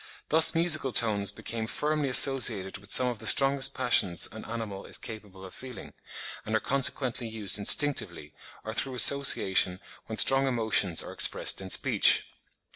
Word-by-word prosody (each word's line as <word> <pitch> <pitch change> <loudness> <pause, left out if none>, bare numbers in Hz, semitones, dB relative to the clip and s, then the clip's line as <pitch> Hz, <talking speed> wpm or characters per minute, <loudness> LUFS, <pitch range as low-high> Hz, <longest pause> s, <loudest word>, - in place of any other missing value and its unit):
Thus 160 +2 +5
musical 155 -5 0
tones 105 -4 -1
became 110 +2 -8
firmly 150 +2 -4
associated 120 -8 +1
with 100 +1 -19
some 130 - +3
of 120 -3 -5
the 110 - -4
strongest 135 +2 +1
passions 105 -9 +1
an 110 - -12
animal 110 -4 -9
is - - -2
capable 105 -4 -12
of 95 - -14
feeling, 130 -2 -12 0.5
and 110 - -5
are - - 0
consequently 130 -2 -2
used 105 -3 0
instinctively, 100 - +1 0.3
or 110 - -7
through 130 +2 -4
association 95 -9 +3 0.3
when 110 - -9
strong 135 +5 +4
emotions 110 -8 -1
are - - -11
expressed - - -1
in 95 - -10
speech. - - +2
115 Hz, 155 wpm, -25 LUFS, 100-135 Hz, 0.5 s, Thus